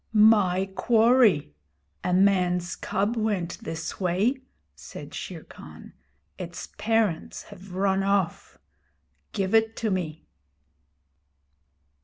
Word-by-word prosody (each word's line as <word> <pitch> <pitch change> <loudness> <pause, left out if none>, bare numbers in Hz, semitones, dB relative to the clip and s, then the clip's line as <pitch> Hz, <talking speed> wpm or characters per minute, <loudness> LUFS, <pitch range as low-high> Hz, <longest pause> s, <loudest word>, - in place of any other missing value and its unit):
'My 205 -4 +4
quarry. 225 - +3 0.5
A 180 - -1
man's 180 -2 +2
cub 205 +4 -1
went 210 -6 -2
this 160 0 -5
way,' 200 +9 +1 0.3
said - - -10
Shere - - -7
Khan. - - -13 0.5
'Its - - -7
parents 220 -6 0
have 185 0 -12
run 195 0 +1
off. 195 -3 -1 0.7
Give 195 -1 -2
it 225 0 +3
to 220 -2 -2
me.' 165 -4 -3
195 Hz, 100 wpm, -26 LUFS, 180-220 Hz, 0.7 s, My